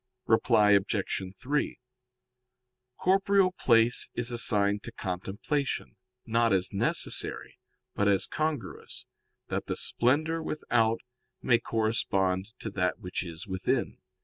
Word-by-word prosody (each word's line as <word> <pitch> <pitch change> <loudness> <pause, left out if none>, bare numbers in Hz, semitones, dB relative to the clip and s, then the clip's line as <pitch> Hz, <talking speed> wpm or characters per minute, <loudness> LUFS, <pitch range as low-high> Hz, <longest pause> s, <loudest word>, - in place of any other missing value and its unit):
Reply 105 -1 +4
Obj. 100 0 +1 0.2
3: 145 0 -1 1.2
Corporeal 195 0 +3
place 115 -7 +3
is 120 0 0
assigned 105 -4 +2
to - - -8
contemplation, 105 +10 -3 0.3
not 115 0 +2
as 95 +1 +1
necessary, 100 - -1 0.3
but 100 - +1
as 100 -2 +3
congruous, 155 -1 -4 0.4
that - - -3
the - - -2
splendor 155 +7 +1
without 115 -8 0 0.4
may 120 -2 +4
correspond 100 -4 0
to 110 - -4
that 90 -2 0
which 90 0 -4
is 85 0 -8
within. 95 -2 -2
110 Hz, 110 wpm, -28 LUFS, 100-130 Hz, 1.2 s, Reply